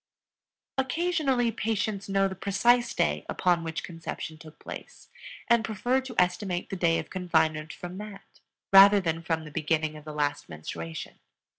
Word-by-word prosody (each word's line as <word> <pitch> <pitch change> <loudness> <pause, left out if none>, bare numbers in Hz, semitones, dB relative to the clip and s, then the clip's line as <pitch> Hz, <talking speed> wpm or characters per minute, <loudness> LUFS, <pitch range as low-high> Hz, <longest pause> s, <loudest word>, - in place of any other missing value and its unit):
Occasionally 270 -4 +1
patients 215 -2 -2
know 195 0 +3
the 190 - -5
precise 220 +6 +2
day 75 0 +1
upon 175 -2 +1
which 160 -1 -4
conception 165 -2 -6
took 155 -1 -13
place, - - -10 0.4
and 235 -2 +4
prefer 240 +5 0
to 260 -2 -9
estimate 180 0 0
the - - -2
day 170 -2 +2
of - - -5
confinement 160 -4 +1
from 180 +2 -8
that 210 -2 -11 0.3
rather 200 +1 +9
than 165 -3 -1
from 160 -1 -1
the 150 - -10
beginning 155 0 0
of 150 - -10
the 155 - -7
last 145 -1 -2
menstruation. 80 +1 -7
180 Hz, 155 wpm, -28 LUFS, 160-215 Hz, 0.4 s, rather